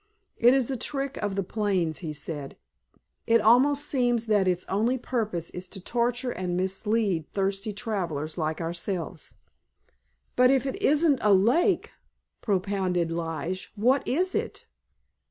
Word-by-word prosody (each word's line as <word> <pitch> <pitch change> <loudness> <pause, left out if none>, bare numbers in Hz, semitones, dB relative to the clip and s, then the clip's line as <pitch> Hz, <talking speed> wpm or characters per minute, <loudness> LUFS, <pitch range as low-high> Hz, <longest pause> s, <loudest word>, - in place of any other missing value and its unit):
"It 245 +3 +5
is 270 -1 +1
a 260 - -2
trick 275 +2 -2
of 205 -2 -2
the 195 - 0
plains," 185 -5 -1
he 160 -4 -5
said. 145 -1 -6 0.7
"It 230 0 +5
almost 265 +7 +4
seems 245 -5 +1
that 205 -4 +2
its 180 0 0
only 225 +6 0
purpose 215 -9 -3
is 180 +1 -6
to 195 - -9
torture 245 +5 -1
and 180 -3 -3
mislead 190 -2 0
thirsty 195 +2 -1
travelers 180 -9 -3
like 155 -2 -2
ourselves." 170 0 -4 1.0
"But 250 0 +5
if 270 -1 +3
it 270 - -4
isn't 295 -1 +3
a 210 - +3
lake," 325 - +2 0.5
propounded 185 -4 0
Lige, 165 +2 -4
"what 250 +6 +2
is 365 +8 0
it? - - -3
205 Hz, 140 wpm, -26 LUFS, 180-245 Hz, 1.0 s, It